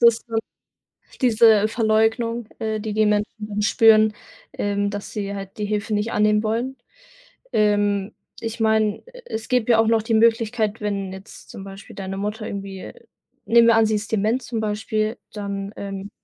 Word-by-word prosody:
ist 235 -1 +4 1.0
diese 225 -3 +5
Verleugnung, 225 +1 +1
äh, 220 -1 -2
die 215 0 -4
die 215 +1 +3
Menschen 210 +1 -1
dann 210 0 -3
spüren, 215 0 +5 0.4
ähm, 205 0 -1
dass 205 0 -6
sie 200 -1 -4
halt 195 0 -8
die 210 - -2
Hilfe 210 +1 -2
nicht 210 +2 0
annehmen 210 0 +2
wollen. 235 +5 -2 0.8
Ähm, 205 -1 +1 0.3
ich 230 0 -5
meine, 220 -1 +1
e - - -13
es 220 0 -5
gibt 245 -2 +1
ja 225 - +5
auch 225 - +4
noch 225 -1 +2
die 225 +1 -1
Möglichkeit, 225 -1 +2
wenn 200 -2 -2
jetzt 190 +2 -12
zum 195 - -9
Beispiel 195 +1 -11
deine 195 -1 -5
Mutter 210 +2 -3
irgendwie 195 -1 -6 0.5
nehmen 235 0 +5
wir 230 - +6
an, 225 0 +5
sie 215 - +1
ist 210 +1 -4
dement 220 +4 +1
zum 230 -1 -4
Beispiel, 215 +1 -1 0.2
dann, 200 -1 -5
ähm 195 0 -6
215 Hz, 170 wpm, -22 LUFS, 205-225 Hz, 1.0 s, wir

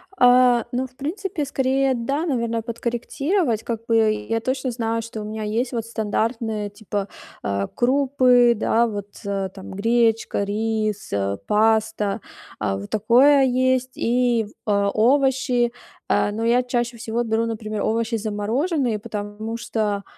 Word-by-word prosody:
А, 245 -2 +5
ну, 255 +1 -1
в 255 - -28
принципе, 335 +2 -3
скорее, 265 0 +1
да, 275 +7 -1
наверно, 235 -6 -1
подкорректировать. 240 - -1
Как 230 -1 -4
бы 225 -2 +3 0.2
я 225 0 +1
точно 260 +1 -2
знаю, 230 -1 -1
что 225 -1 -7
у - - -6
меня 215 0 -5
есть 235 +4 -1
вот 230 -1 -2
стандартные, 220 -1 -2
типа, 205 -1 -4 0.4
а, 100 0 -1
крупы, 255 -2 +3
да, 230 +2 +2
вот, 205 -2 -5 0.2
э. 195 -1 -2
Там 190 -1 -10
гречка, 225 +1 +1
рис, 215 0 -2
а, 100 0 -1
паста, 215 -1 +1 0.4
а, 95 0 -1
вот 100 +1 -8
такое 260 +6 +5
есть, 255 0 +1
и 240 -2 +1
в 210 - -15 0.2
а, 200 -1 +2
овощи. 255 +1 +2 0.4
А, 205 - +2
но 225 +2 -3
я 245 +2 +3
чаще 240 -1 -2
всего 230 +1 -2
беру, 225 0 0
например, 215 -2 -4
овощи 230 +1 0
замороженные, 225 - -1
потому 210 +2 -5
что, 215 -3 -2
230 Hz, 145 wpm, -22 LUFS, 215-250 Hz, 0.4 s, А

